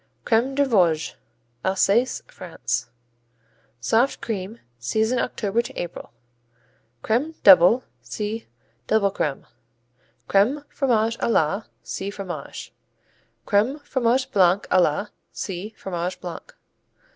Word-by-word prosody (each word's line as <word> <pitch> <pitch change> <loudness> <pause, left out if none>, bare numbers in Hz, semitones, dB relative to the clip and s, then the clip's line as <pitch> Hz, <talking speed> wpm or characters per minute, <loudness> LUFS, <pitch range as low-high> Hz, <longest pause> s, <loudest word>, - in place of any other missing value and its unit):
Crème 245 +4 +2
des 285 0 +3
Vosges 170 -9 +2 0.5
Alsace, 200 +6 +2
France - - -4 0.9
Soft 225 - +2
cream. 215 +1 -5 0.2
Season 220 - 0
October 220 -1 0
to - - -10
April. 175 -1 -6 0.9
Crème 285 +9 0
Double 190 +6 +8 0.2
see 210 - -5 0.4
Double 205 -2 +3
Crème. 145 -7 -2 0.8
Crème, 250 +10 +2
Fromage 230 -4 +1
à - - 0
la 195 +1 +1 0.2
see 195 - -4
Fromage. 185 -7 -7 0.7
Crème, 225 +9 +2
Fromage 255 0 +1
Blanc 190 0 +4
à 185 - +6
la 175 +6 +1 0.2
see 195 +2 -5
Fromage 180 -1 -4
Blanc. 175 -2 -6
210 Hz, 105 wpm, -23 LUFS, 185-235 Hz, 0.9 s, Double